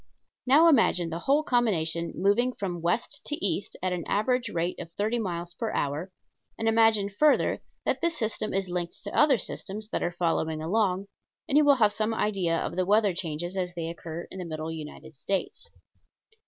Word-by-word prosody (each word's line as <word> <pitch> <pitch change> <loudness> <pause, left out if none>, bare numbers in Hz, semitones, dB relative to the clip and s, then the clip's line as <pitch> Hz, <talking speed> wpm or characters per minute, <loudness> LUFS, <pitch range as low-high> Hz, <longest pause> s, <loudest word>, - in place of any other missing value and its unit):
Now 300 +6 +7
imagine 180 - +3
the 165 - -3
whole 280 - +2
combination 170 - 0
moving 235 +6 +2
from 180 -6 -4
west 225 - -1
to 295 - -1
east 195 - -1
at 185 -1 +1
an 175 -2 -3
average 245 +3 +1
rate 170 -1 -2
of 165 - -8
thirty 220 +5 0
miles 175 -4 -4
per 220 +5 -3
hour, 150 +6 -2 0.5
and 225 - -2
imagine 225 -2 +4
further 285 +10 +2 0.2
that - - 0
this 335 -2 +1
system 220 -2 -2
is 195 0 -1
linked 175 -1 -4
to 205 - -6
other 290 -4 +5
systems 210 +1 -5
that - - -2
are 175 - 0
following 165 -2 -1
along, 190 +3 0 0.4
and 275 - 0
you 295 -1 +5
have 215 -5 +3
some 220 +1 -1
idea 190 -6 0
of 170 - -3
the 185 - +1
weather 205 -1 +4
changes 175 +1 -4
as 180 -2 -3
they 165 -1 -3
occur 170 0 -6
in 190 - -7
the 180 - -4
middle 160 -1 -4
United 155 0 -8
States. 185 +7 -3
190 Hz, 185 wpm, -27 LUFS, 170-225 Hz, 0.5 s, Now